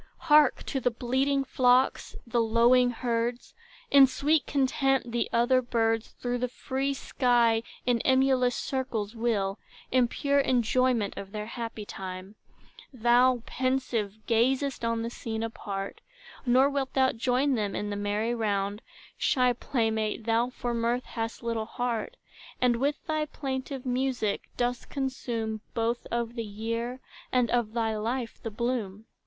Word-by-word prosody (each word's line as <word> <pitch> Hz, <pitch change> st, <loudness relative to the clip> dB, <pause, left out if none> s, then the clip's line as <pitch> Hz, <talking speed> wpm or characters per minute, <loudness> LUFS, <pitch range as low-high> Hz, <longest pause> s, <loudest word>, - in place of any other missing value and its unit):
Hark 300 Hz, -2 st, +6 dB
to 270 Hz, -, -2 dB
the 250 Hz, -, +2 dB
bleating 265 Hz, +4 st, 0 dB
flocks, 255 Hz, 0 st, +2 dB
the 235 Hz, 0 st, +1 dB
lowing 235 Hz, +2 st, +4 dB
herds! 240 Hz, 0 st, -2 dB, 0.4 s
In 275 Hz, -1 st, +8 dB
sweet 295 Hz, +3 st, +1 dB
content, 270 Hz, -2 st, +1 dB
the 235 Hz, 0 st, -1 dB
other 240 Hz, +2 st, +3 dB
birds 225 Hz, -2 st, 0 dB
Through 245 Hz, 0 st, -3 dB
the 250 Hz, -, 0 dB
free 265 Hz, +2 st, -2 dB
sky 240 Hz, -4 st, +2 dB, 0.2 s
in 245 Hz, -1 st, +2 dB
emulous 260 Hz, -1 st, +3 dB
circles 240 Hz, -5 st, -3 dB
wheel, 215 Hz, -4 st, 0 dB, 0.3 s
In 255 Hz, -1 st, +4 dB
pure 280 Hz, +3 st, +1 dB
enjoyment 250 Hz, -3 st, +2 dB
of 195 Hz, 0 st, -7 dB
their 210 Hz, 0 st, -4 dB
happy 230 Hz, -2 st, -6 dB
time: 190 Hz, 0 st, -7 dB, 0.6 s
Thou, 245 Hz, 0 st, +3 dB
pensive, 255 Hz, -6 st, -1 dB
gazest 260 Hz, +4 st, +1 dB
on 230 Hz, 0 st, 0 dB
the 230 Hz, -, -4 dB
scene 225 Hz, -2 st, -4 dB
apart, 200 Hz, -3 st, -5 dB, 0.5 s
Nor 255 Hz, +3 st, +5 dB
wilt 275 Hz, -2 st, -2 dB
thou 265 Hz, -1 st, +4 dB
join 255 Hz, +4 st, +1 dB
them 210 Hz, -4 st, -1 dB
in 205 Hz, 0 st, -3 dB
the -, -, -2 dB
merry 205 Hz, +3 st, -1 dB
round; 205 Hz, -2 st, -1 dB, 0.4 s
Shy 250 Hz, -2 st, +3 dB
playmate, 220 Hz, -3 st, -1 dB
thou 230 Hz, +1 st, +2 dB
for 245 Hz, -1 st, -4 dB
mirth 235 Hz, +2 st, 0 dB
hast 225 Hz, 0 st, -5 dB
little 230 Hz, -2 st, -2 dB
heart; 245 Hz, -, -3 dB, 0.4 s
And 245 Hz, -2 st, +3 dB
with 285 Hz, +4 st, -1 dB
thy 310 Hz, -1 st, -1 dB
plaintive 265 Hz, -2 st, -5 dB
music, 250 Hz, -4 st, -1 dB
dost 245 Hz, 0 st, -1 dB
consume 235 Hz, -5 st, -3 dB
Both 230 Hz, +1 st, -1 dB
of 235 Hz, 0 st, -2 dB
the 230 Hz, -1 st, -3 dB
year, 230 Hz, +4 st, -4 dB, 0.3 s
and 250 Hz, -2 st, +2 dB
of 235 Hz, -3 st, 0 dB
thy 225 Hz, -2 st, 0 dB
life, 230 Hz, +2 st, -3 dB
the 225 Hz, -, -4 dB
bloom. 220 Hz, -2 st, -3 dB
240 Hz, 145 wpm, -28 LUFS, 225-260 Hz, 0.6 s, In